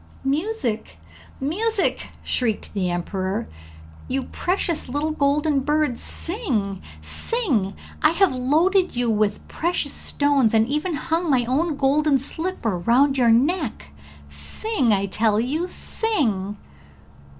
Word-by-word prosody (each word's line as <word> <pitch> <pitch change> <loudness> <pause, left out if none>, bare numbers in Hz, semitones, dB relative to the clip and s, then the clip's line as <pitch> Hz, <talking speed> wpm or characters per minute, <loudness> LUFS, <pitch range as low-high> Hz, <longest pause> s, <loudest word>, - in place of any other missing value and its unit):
'Music, 270 - -1 0.4
music!' 400 +9 0 0.2
shrieked 225 -4 -1
the 190 -3 0
emperor. 185 +3 -2 0.6
'You 265 0 -1
precious 350 -4 -2
little 290 +4 -1
golden 290 0 +2
bird, 295 -2 0
sing, 235 - -3 0.2
sing! 265 - 0 0.3
I 310 - +6
have 340 0 +3
loaded 325 +9 +2
you 240 -1 +1
with 210 -1 0
precious 330 -4 -1
stones, 280 -6 +2
and 220 0 +4
even 300 +5 -1
hung 330 +3 -1
my 255 -4 +3
own 295 +6 0
golden 285 +1 +3
slipper 270 - -3
round 260 +9 +3
your 240 -2 +5
neck; 255 - +1 0.4
sing, 235 - -1
I 200 -1 +2
tell 210 +2 +1
you, 300 +9 -1
sing!' 225 - -1
275 Hz, 115 wpm, -23 LUFS, 220-325 Hz, 0.6 s, I